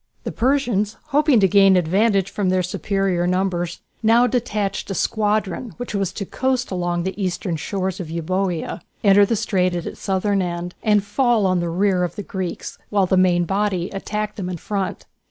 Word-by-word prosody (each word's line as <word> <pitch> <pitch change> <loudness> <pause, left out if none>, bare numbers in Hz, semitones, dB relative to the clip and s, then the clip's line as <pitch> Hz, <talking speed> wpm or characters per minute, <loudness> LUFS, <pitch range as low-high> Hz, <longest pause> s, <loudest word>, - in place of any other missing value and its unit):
The - - -4
Persians, 235 -5 0
hoping 295 -3 +4
to 195 - +5
gain 195 0 +5
an - - +5
advantage 195 +3 +2
from 200 -3 -1
their 185 0 +2
superior 190 -1 -1
numbers, 180 -2 -1 0.2
now 230 +2 +5
detached 215 -7 -1
a 195 - -3
squadron 215 +3 -1
which 245 -2 -6
was 195 -3 -1
to 200 - -4
coast 260 +2 -1
along 175 -1 -1
the 190 +2 -3
eastern 180 -1 -2
shores 190 +3 -3
of 170 -4 -5
Euboea, 175 +1 -2 0.2
enter 200 0 +6
the 230 - +1
strait 185 -4 0
at 175 - -3
its - - -7
southern 195 0 0
end, 175 0 -4
and 210 -2 +3
fall 225 +1 +2
on 185 -1 +2
the 175 0 -2
rear 185 +1 +1
of 175 - -3
the 205 - -5
Greeks, 190 -3 -5
while 200 -2 +2
the 185 - +1
main 180 -2 +3
body 195 -1 -1
attacked 210 +2 -4
them 185 -3 -4
in 180 - -4
front. 195 +3 -3
195 Hz, 190 wpm, -21 LUFS, 180-210 Hz, 0.2 s, enter